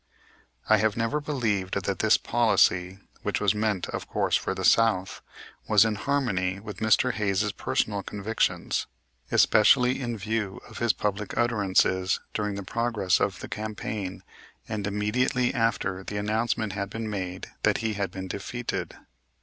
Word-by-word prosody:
I 110 - +6
have 110 0 +1
never 115 +6 0
believed 110 -10 -1
that 95 -1 -2
this 110 0 +5
policy, 95 -5 +2 0.2
which - - -1
was 100 -2 +3
meant, 105 -3 -1
of - - -5
course, - - +1
for - - -1
the - - -3
South, 110 -5 +3 0.5
was 110 0 +6
in 110 - +1
harmony 100 -6 -1
with 105 -2 -8
Mr. 110 +3 +3
Hayes' 105 0 0
personal 100 0 -1
convictions; 105 +3 -1 0.4
especially 125 +4 +5
in 120 -2 -3
view 105 -1 -2
of - - -10
his 120 -1 +3
public 105 0 -3
utterances 95 -5 +2
during 105 -1 -2
the 100 - -5
progress 110 -2 0
of - - -1
the - - -6
campaign 105 -3 -5 0.4
and 105 -2 -3
immediately 120 +5 +1
after 100 -5 0
the 100 - -5
announcement 110 0 -1
had 100 -1 -3
been 115 +1 -4
made 95 -3 -5
that - - +2
he 110 - 0
had 100 -2 -2
been 95 +1 -6
defeated. 115 +6 -4
105 Hz, 150 wpm, -27 LUFS, 100-115 Hz, 0.5 s, I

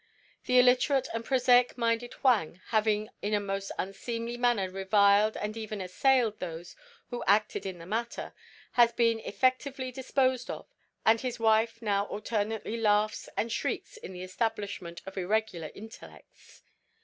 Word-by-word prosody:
The 250 - +3
illiterate 255 +2 +4
and 230 0 -3
prosaic 250 -1 +3
minded 235 0 0
Huang, 205 - +2
having 215 -1 +1
in 210 +1 0
a - - +2
most 195 -1 -4
unseemly 230 +5 -4
manner 240 -5 +1
reviled 200 +2 +3
and 210 +1 -4
even 215 -2 -5
assailed 220 +4 +2
those 175 -1 -7 0.4
who 245 - -4
acted 205 0 +2
in 185 -2 -5
the 165 - -11
matter, 230 +5 -4 0.4
has 235 -1 +5
been 230 -1 +2
effectively 255 +3 -1
disposed 260 -1 0
of, - - -6 0.4
and 225 0 +5
his 245 -2 -4
wife 225 +1 +2
now 200 -2 +1
alternately 215 +1 -3
laughs 210 -1 +1
and 230 - -1
shrieks 485 - -3
in 440 - -9
the 180 0 -7
Establishment 200 -3 -3
of 195 0 -6
Irregular 185 -4 -1
Intellects. 220 +2 -14
220 Hz, 145 wpm, -29 LUFS, 200-240 Hz, 0.4 s, has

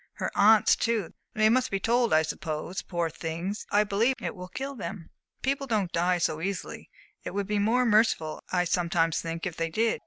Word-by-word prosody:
Her - - -3
aunts 215 +1 +5
too 225 -7 -1 0.2
they 215 0 +4
must 255 +3 +2
be 195 - -1
told, 235 +3 +2
I 155 0 +5
suppose. 160 +3 -4
Poor 170 -2 -2
things, 165 +5 -5
I 205 +1 +4
believe 215 +6 +1
it - - -4
will 180 -1 -8
kill 270 +8 -5
them!" 190 -7 -7 0.3
"People 275 +1 -1
don't 210 -7 0
die 175 +1 +2
so 160 -2 -1
easily. 190 +1 -5 0.3
It - - -6
would 200 0 -1
be 210 +1 -1
more 235 +5 +2
merciful, 215 -8 +2
I 180 -1 +2
sometimes 170 -2 +1
think, 165 +1 -5
if 180 -3 -4
they 165 0 -1
did." 220 +7 0
195 Hz, 195 wpm, -27 LUFS, 170-225 Hz, 0.3 s, aunts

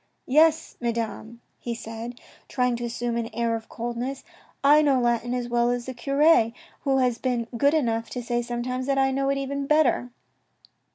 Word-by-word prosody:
" - - -47
Yes, 315 +3 +3
Madame," 235 0 -3 0.2
he 235 -1 -4
said, 230 +2 -7 0.3
trying 250 -2 0
to 240 - -6
assume 235 0 -2
an 230 -1 -2
air 235 -1 0
of 225 0 -7
coldness, 240 +3 -4 0.2
" - - -34
I 305 - +7
know 280 -4 +3
Latin 240 0 0
as 245 -1 -2
well 240 0 +2
as 245 -1 -1
the 260 - -5
cure, 275 -1 +3 0.3
who 270 -1 +1
has 250 -3 +1
been 245 -3 -1
good 285 +5 +3
enough 230 -6 0
to 245 - -3
say 240 +1 -1
sometimes 250 +2 -3
that 275 -1 +1
I 270 0 +3
know 275 +1 0
it 275 - +1
even 275 0 -3
better." 300 -5 +3
245 Hz, 190 wpm, -25 LUFS, 235-275 Hz, 0.3 s, I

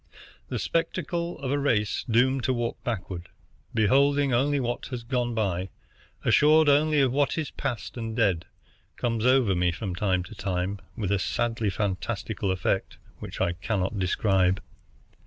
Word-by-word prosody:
The - - -2
spectacle 170 0 -1
of 135 -1 -3
a 145 - +1
race 105 -7 +1
doomed 130 +3 +3
to 130 - +2
walk 120 -1 -3
backward, 95 -6 -4 0.4
beholding 140 +5 +3
only 140 +4 +2
what 120 -1 -2
has 125 -3 -5
gone 120 -1 -1
by, 95 -4 -1 0.6
assured 155 +1 +5
only 150 +1 +4
of 130 -2 +3
what 145 +4 +1
is 155 -3 -2
past 120 +1 -4
and 115 -1 -4
dead,' 100 -8 +1 0.5
comes 115 -1 0
over 130 -6 +4
me 90 -1 +2
from 95 +2 -4
time 90 -1 0
to 110 - -11
time 95 -1 -2 0.2
with 100 -3 -1
a 100 - +2
sadly 115 0 0
fantastical 100 0 -2
effect 95 +1 -1 0.2
which - - -7
I 85 - +1
cannot 95 +3 -2
describe. 95 0 +2
115 Hz, 155 wpm, -27 LUFS, 95-135 Hz, 0.6 s, assured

